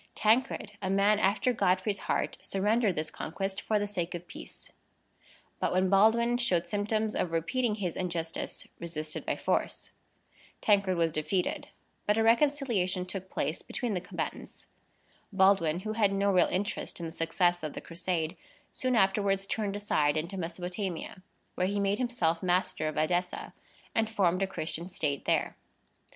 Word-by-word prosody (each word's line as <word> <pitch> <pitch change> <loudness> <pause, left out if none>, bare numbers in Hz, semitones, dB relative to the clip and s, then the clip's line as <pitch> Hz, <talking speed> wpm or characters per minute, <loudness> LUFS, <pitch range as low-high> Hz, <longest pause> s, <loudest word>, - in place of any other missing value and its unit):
Tancred, 220 -1 +2
a 190 - -2
man 200 +2 +4
after 215 +5 +2
Godfrey's 195 -1 +1
heart, - - 0
surrendered 205 0 +1
this 155 +1 -3
conquest 195 +4 -4
for 215 - +1
the 205 - 0
sake 180 -4 -3
of 175 0 -7
peace; - - -11 0.9
but, - - 0
when 185 +1 +2
Baldwin 235 +4 +4
showed 180 -8 +1
symptoms 215 +1 0
of 180 - 0
repeating 210 +8 0
his 185 -6 -3
injustice, 170 -3 -3
resisted 155 -2 -5
by - - +1
force. - - -1 0.7
Tancred 200 -3 +3
was 165 -2 +2
defeated, 175 +4 -1 0.4
but 210 +1 +3
a 225 - +3
reconciliation 230 -7 +2
took 190 0 -6
place 155 -2 -2
between 245 -4 -3
the 180 - -1
combatants. 180 - -6 0.7
Baldwin, 190 -4 +3
who 215 +2 -3
had 215 -3 +3
no 200 0 +2
real 180 -2 +5
interest 200 0 -3
in 170 - -4
the 165 - -5
success 175 +2 +1
of 155 -2 -4
the - - -5
Crusade, 170 -1 -2 0.4
soon 255 -1 0
afterwards 195 -1 +2
turned 205 -1 -2
aside 155 -7 +1
into 170 +5 -3
Mesopotamia, 180 +1 -4 0.3
where 180 - 0
he 200 +1 -1
made 200 +2 +1
himself 180 -10 0
master 180 -3 +1
of 155 - -3
Edessa, 175 +3 0 0.4
and 220 -1 +1
formed 185 -4 +2
a 195 - +2
Christian 170 -1 -4
state 145 -6 -2
there. - - +1
190 Hz, 155 wpm, -30 LUFS, 175-210 Hz, 0.9 s, real